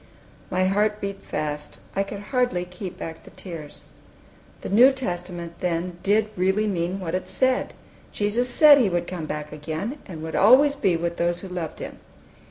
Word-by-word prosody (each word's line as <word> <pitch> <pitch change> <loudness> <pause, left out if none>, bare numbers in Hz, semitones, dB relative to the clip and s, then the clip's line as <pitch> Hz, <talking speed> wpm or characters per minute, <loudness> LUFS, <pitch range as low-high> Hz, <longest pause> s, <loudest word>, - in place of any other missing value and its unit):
My 185 +1 +1
heart 210 +2 +1
beat 200 -1 -5
fast. 150 -1 -4 0.2
I 195 - +2
could 200 0 -5
hardly 245 -9 +1
keep 180 0 -8
back 160 -2 -7
the - - -13
tears. 165 -6 -9 0.8
The - - -5
New 240 +7 +7
Testament, 175 -8 -5
then, 175 0 -2
did 210 +2 +2
really 190 +4 +2
mean 185 -1 -1
what 170 -4 -4
it 185 0 -2
said! 255 +8 +1 0.4
Jesus 220 +4 0
said 290 +3 +8
He 230 -6 +3
would 175 -1 -1
come 170 -4 -5
back 150 0 -5
again, 160 - -4
and 160 -4 -7
would 160 - -4
always 270 +7 +6
be 195 -10 +2
with 170 +1 -3
those 175 +1 0
who 195 - -7
loved 175 -4 -5
Him. - - -8
185 Hz, 180 wpm, -24 LUFS, 170-210 Hz, 0.8 s, said